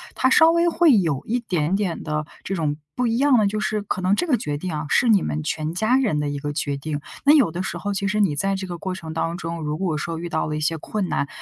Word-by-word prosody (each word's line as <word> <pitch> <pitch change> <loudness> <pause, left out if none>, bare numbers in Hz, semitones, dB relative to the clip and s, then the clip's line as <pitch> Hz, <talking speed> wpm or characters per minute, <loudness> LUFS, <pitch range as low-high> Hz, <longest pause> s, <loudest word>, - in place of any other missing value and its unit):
它 260 - +2
稍 320 +3 +7
微 340 +1 +3
会 330 -6 +5
有 160 -8 0
一 240 +3 0
点 180 -7 -1
点 195 -5 -2
的 150 -1 -2 0.2
这 195 - -3
种 150 -4 -1 0.2
不 250 -1 0
一 230 0 0
样 275 -1 +4
的 215 - +3
就 215 +2 -2
是， 215 0 -1
可 195 - -3
能 185 +2 +3
这 355 - 0
个 270 -6 +3
决 145 -6 -3
定 180 +4 -4
啊， 150 +1 -3
是 240 - +3
你 205 -4 +5
们 155 0 -3
全 155 +1 -2
家 220 +8 +2
人 240 - +1
的 145 -1 -1
一 145 0 -4
个 145 +1 -4
决 145 -2 -2
定。 145 +1 -4 0.2
那 290 - +7
有 270 - +4
的 175 +2 -4
时 190 - -4
候， 205 0 -3
其 200 0 -1
实 210 +1 +1
你 175 -8 +2
在 195 +5 0
这 190 0 -5
个 175 -1 -5
过 185 +2 -4
程 160 -3 -7
当 165 +1 -1
中， 165 -1 -5
如 150 0 -2
果 170 -4 -1
说 165 +2 -4
遇 170 +1 -5
到 160 - -1
了 155 - -3
一 155 - -3
些 160 +2 0
困 190 +4 -3
难， 140 - 0
180 Hz, 315 characters per minute, -23 LUFS, 155-215 Hz, 0.2 s, 稍